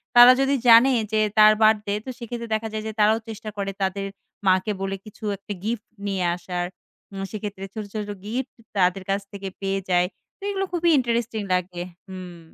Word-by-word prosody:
তারা 245 +1 +11
যদি 270 +1 +3
জানে 235 +3 +8 0.2
যে 215 - +2 0.2
তার 215 0 +9
বার্থডে 215 -2 +4
তো - - -6
সেক্ষেত্রে 235 -1 -6
দেখা 220 +1 -2
যায় 215 0 -3
যে - - -2
তারাও 215 +1 +5
চেষ্টা 215 0 -6
করে 195 -1 -2
তাদের 195 +1 -1 0.4
মাকে 185 +3 +3
বলে 195 0 -1
কিছু 215 +1 -14
একটা 205 +2 -6
গিফট 225 0 -3 0.2
নিয়ে 195 -2 -1
আসার। 175 0 -3 0.5
উম 195 0 -4
সেক্ষেত্রে 205 -2 -5
ছোটো, 215 -2 -5
ছোটো 210 -1 -3
গিফট 245 +5 -3 0.2
তাদের 185 0 +2
কাছ 195 +1 +1
থেকে 200 -1 -6
পেয়ে 195 0 0
যায় 180 0 +3 0.3
তো - - -65
এগুলো 390 -1 -1
খুবই 345 -1 +2
ইন্টারেস্টিং 235 -3 0
লাগে। 180 -1 -1 0.3
হুম। 185 -2 -8
210 Hz, 180 wpm, -24 LUFS, 195-230 Hz, 0.5 s, তারা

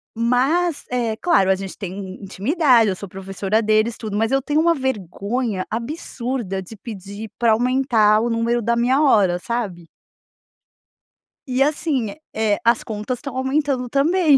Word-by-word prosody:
Mas, 270 +9 +1
eh, 235 -3 0
claro, 195 - +3
a 190 - +5
gente 190 0 -7
tem 185 -3 -5
in 190 0 -8
intimidade, 235 - +3
eu 185 - -1
sou 200 - -7
professora 195 +3 -2
deles 215 +1 +2
tudo, 215 -3 -4
mas 225 +1 +1
eu 270 0 +2
tenho 295 +3 0
uma 335 +1 +3
vergonha 220 - -2
absurda 235 - -4
de 190 +4 -10
pedir 205 0 -8
pra 230 -2 +4
aumentar 235 -3 +3
o 235 +2 0
número 235 +1 +1
da 235 +1 +1
minha 250 +4 +2
hora, 200 -11 +4
sabe? 195 -6 -4 1.6
E 260 +1 +2
assim, 285 -7 -1 0.2
eh, 215 -2 +1
as 235 0 +3
contas 215 +3 -4
estão 275 0 -7
aumentando 265 -1 0
também 305 +2 +4
235 Hz, 155 wpm, -21 LUFS, 205-265 Hz, 1.6 s, a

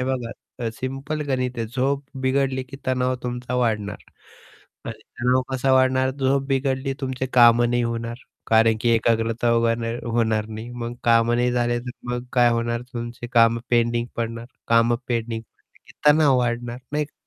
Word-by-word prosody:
हे - - 0
बघा 130 -3 -2 0.4
अ, - - +1
सिंपल 135 +5 -4
गणित 125 -2 -1
आहे, 115 - -1
झोप 135 +4 -1 0.2
बिघडली 130 0 +1
की 130 +2 -11
तणाव 130 0 +1
तुमचा 125 0 -4
वाढणार 105 -4 0 0.9
आणि - - -6 0.2
तणाव 125 +1 +3
कसा 130 +1 +1
वाढणार? 130 0 +3
झोप 135 0 0
बिघडली, 135 0 0
तुमचे 130 -1 -3
कामं 120 0 +6
नाही 120 0 +1
होणार 115 0 -3 0.3
कारण 110 0 +4
की 120 - +1
एकाग्रता 115 +1 +1
व्हना 115 0 +1 0.2
होणार 110 -2 +1
नाही, 110 +2 -7
मग 120 -1 -5
कामं 115 0 +4
नाही 125 0 +1
झाले 120 -1 +1
तर 125 +1 -7 0.2
मग 125 0 -3
काय 120 -1 +5
होणार 115 0 -1
तुमचे 120 0 -6
कामं 115 -1 +4
पेंडिंग 120 0 +2
पडणार, 115 0 -4 0.2
कामं 115 +1 +4
पेंडिंग 115 -1 -2
पडले - - -33
की - - -16 0.2
तणाव 150 -3 +5
वाढणार 120 0 -2
नाही 150 0 +1
का. 150 - -19
120 Hz, 165 wpm, -23 LUFS, 115-130 Hz, 0.9 s, कामं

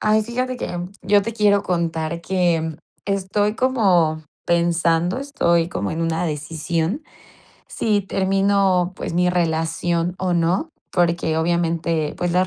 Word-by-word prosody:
Ay, 215 0 +3
fíjate 255 +3 -2
que, 175 - -4
mm, 175 +2 -6
yo 200 +1 +4
te 230 - -4
quiero 205 -2 +3
contar 170 -2 -2
que, 175 -2 +1
mm, 160 -1 -4 0.3
estoy 200 +2 0
como 185 -12 +2 0.2
pensando, 170 +2 +2
estoy 170 -12 +1
como 100 - -3
en 160 - -3
una 165 +1 0
decisión 160 - -2 0.7
si 210 -2 +1
termino, 195 -1 +2
pues, - - -5
mi 180 +1 +3
relación 170 0 0
o 185 -1 0
no, 175 - +1 0.2
porque, 170 -2 +1
obviamente, 165 -2 0
pues, 175 -1 -1
las 180 +1 +3
175 Hz, 140 wpm, -21 LUFS, 165-195 Hz, 0.7 s, yo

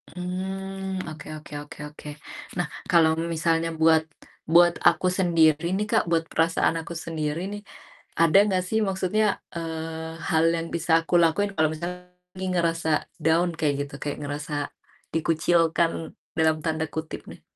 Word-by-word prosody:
Mmm, 190 +1 -4
oke 155 -1 -9
oke 150 0 -13
oke 145 - -13
oke. 150 0 -11 0.5
Nah, 175 -3 0 0.2
kalau 165 -2 +6 0.2
misalnya 165 0 +1
buat 160 0 +5 0.5
buat 175 0 +7
aku 175 +1 +4
sendiri 165 -3 +4
nih 210 - 0
Kak, - - +4
buat 165 -1 +2
perasaan 165 0 +2
aku 170 - -8
sendiri 155 -1 -2
nih. 205 0 -6 0.6
Ada 165 +2 +6
nggak 185 -2 +1
sih 220 - +2
maksudnya, 195 +3 +1 0.3
eee, 160 -1 -5 0.2
hal 160 -3 +3
yang 165 0 -3
bisa 165 0 -2
aku - - -6
lakuin 185 +5 +2
kalau 155 -1 +3
misal 170 +3 -4 0.5
lagi 190 0 -4
ngerasa 165 -2 0 0.3
down 165 +2 +3
kayak 150 -2 +2
gitu, - - -18
kayak 145 - -3
ngerasa 145 +1 -5 0.6
"dikucilkan," 165 +1 +2 0.5
dalam 160 -1 +3
tanda 160 -1 0
kutip 160 0 -5
nih? - - -13
165 Hz, 145 wpm, -25 LUFS, 160-180 Hz, 0.6 s, buat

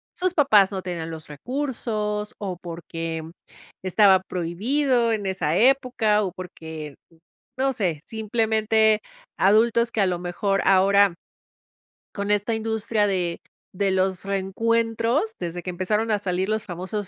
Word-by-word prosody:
sus 365 0 -1
papás 215 - +5
no 190 -2 -4
tenían 170 -3 -4
los 160 -1 -8
recursos, 215 - -3
o 190 -3 -4
porque 165 -1 -5 0.6
estaba 190 0 +5
prohibido 230 - 0
en 210 -2 -1
esa 185 -4 0
época, 245 -4 +3
o 190 -3 -2
porque, 160 -5 -8 0.2
uh, 165 - -24 0.4
no 270 +1 +1
sé. 175 -9 -1
Simplemente, 220 -1 +1 0.4
adultos 230 +4 +4
que 220 - 0
a 195 - +4
lo 180 -1 -1
mejor 195 +3 -1
ahora, 195 0 +5 1.0
con 200 0 -2
esta 210 +2 +1
industria 220 -1 0
de 180 -4 -1 0.4
de 195 +1 +1
los 190 0 0
reencuentros, 225 +5 0 0.2
desde 175 0 -4
que 185 - -6
empezaron 210 +5 -1
a 210 - +2
salir 190 0 -2
los 215 +1 -1
famosos 190 +3 -4
200 Hz, 135 wpm, -24 LUFS, 180-225 Hz, 1.0 s, papás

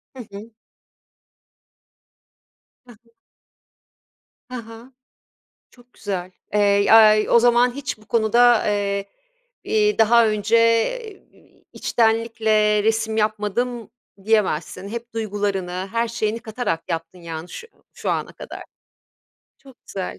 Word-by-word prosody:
Hı 255 - -8
hı. 205 +3 -10 2.4
He 245 - -15
he. 230 - -30 1.4
Ha 245 -3 -7
ha. 230 +3 -13 0.8
Çok 245 0 -23
güzel. 185 -3 -5 0.2
Eee, 210 - +3
yay 215 +1 +5
o - - +6
zaman 240 +1 +3
hiç 280 -5 -5
bu 215 - -21
konuda, 235 +1 +3
eee, 200 -1 -1 0.6
iii, 420 -1 +1
daha 230 +1 +5
önce, 215 +2 +1 0.7
iii, - - -26
içtenlikle 220 -2 +1
resim 220 0 0
yapmadım 215 +2 -2 0.3
diyemezsin. 200 -3 0
Hep 235 +2 -8
duygularını, 195 -4 -3
her 230 0 0
şeyini 225 -1 -2
katarak 220 -7 -3
yaptın, 165 +2 -5
yani, 165 0 -7
şu 465 - -9 0.3
şu - - -4
ana - - -3
kadar. - - -10 1.0
Çok 270 -3 -18
güzel. 190 -2 -6
220 Hz, 110 wpm, -21 LUFS, 205-235 Hz, 2.4 s, o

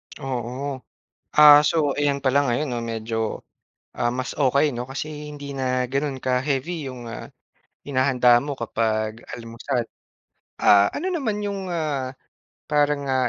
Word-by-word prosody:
Oo. 130 0 -4 0.6
Ah 150 -1 +10
so - - -1 0.2
ayan 145 -1 +1
pala 130 +1 +3
ngayon 125 +5 0
'no 120 - -2
medyo 115 0 -4 0.8
ah, 120 - +1
mas 130 - -3
okey 140 +1 +2
'no. 120 +1 -5
Kasi 150 +2 -6
hindi 145 -1 -8
na 130 -1 0
ganun 140 +1 -2
ka 125 -1 +2
heavy 145 +2 -2
'yong 125 -2 -8
ah, 115 - -7 0.6
hinahanda 130 -3 +4
mo 145 -1 -4
kapag 110 -1 -1
almusal. 115 +2 -3 0.8
Ah, 100 0 +6
ano 355 - -4
naman 230 -10 -1
'yong 200 -1 -3
ah, 145 -6 -2 0.6
parang 145 -1 +1
ah, 130 -2 +2
135 Hz, 140 wpm, -23 LUFS, 120-145 Hz, 0.8 s, Ah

